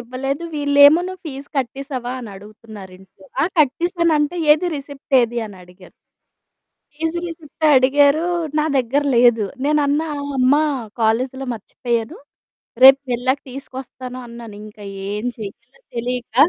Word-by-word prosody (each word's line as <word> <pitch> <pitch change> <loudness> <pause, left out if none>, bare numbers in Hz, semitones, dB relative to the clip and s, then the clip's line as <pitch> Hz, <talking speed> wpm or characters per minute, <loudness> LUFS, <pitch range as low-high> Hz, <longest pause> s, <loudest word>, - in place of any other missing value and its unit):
ఇవ్వలేదు. 270 +5 -4
వీళ్ళేమో, 285 +2 +6
"నువ్వు 370 0 -8
ఫీజ్ 275 -1 -7
కట్టేసావా?" 255 -1 -4
అని 230 - -8
అడుగుతున్నారింట్లో. 195 -2 -13 0.2
ఆ! - - +4
కట్టేసాను 335 +3 +2
అంటే, 295 +4 -1 0.2
"ఏది 315 +4 0
రిసిప్ట్ 280 0 -6
ఏది?" 240 0 -1
అని 200 -2 -12
అడిగారు. 180 +1 -17 1.0
ఫీజ్ 325 +2 -2
రిసిప్ట్ 315 -1 -5
అడిగారు. 285 +4 +4 0.4
నా 300 - +1
దగ్గర 265 +4 +1
లేదు. 235 -3 +4 0.2
నేనన్నా, 300 +1 +1
ఆ! - - -4 0.2
అమ్మ, 255 +2 +4 0.5
కాలేజిలో 255 +4 0
మర్చిపోయాను. 230 +1 -4 0.7
రేపు 270 +1 +9
వెళ్ళాక 260 +3 0
తీసుకొస్తాను 255 -1 -8
అన్నాను. 235 -2 -10
ఇంకా 210 -1 -13 0.3
ఏం 210 +3 -4
చెయ్యాలో 215 - -10
తెలీక 240 -1 -4
260 Hz, 125 wpm, -20 LUFS, 230-285 Hz, 1.0 s, రేపు